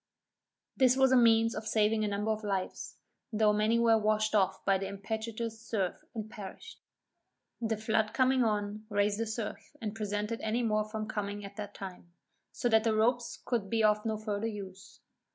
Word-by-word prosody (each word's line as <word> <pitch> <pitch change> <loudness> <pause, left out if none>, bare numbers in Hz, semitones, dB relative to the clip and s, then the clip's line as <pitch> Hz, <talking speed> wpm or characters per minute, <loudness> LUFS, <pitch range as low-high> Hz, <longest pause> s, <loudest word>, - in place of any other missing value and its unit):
This 260 -1 +4
was 265 -1 +5
a - - +6
means 230 -2 +5
of 215 0 -5
saving 215 0 +2
a - - +1
number 205 +2 -1
of 215 0 -3
lives, 195 -3 -3 0.4
though 215 -1 +3
many 215 +2 +2
were 230 -1 +4
washed 215 0 +1
off 190 -2 +1
by 195 -1 +3
the 195 - -3
impetuous 220 +3 -4
surf, 195 -6 -2
and 220 -1 -4
perished. 215 - -10 0.8
The 225 -1 0
flood 220 0 +1
coming 260 +1 +3
on, 210 -1 -1
raised 205 0 +1
the 230 - -1
surf, 220 +6 -5
and 215 -3 -4
prevented 210 +1 -3
any 225 +3 0
more 215 -2 +1
from 215 0 -4
coming 205 -1 -4
at 200 0 -10
that 205 -1 -6
time, 180 -3 -9 0.4
so - - -1
that 220 -1 +4
the 225 -1 +2
ropes 235 +2 +1
could 225 -6 -1
be 225 0 +1
of 210 0 +3
no 220 -1 -1
further 215 0 -2
use. 195 -2 -8
215 Hz, 185 wpm, -31 LUFS, 205-225 Hz, 0.8 s, a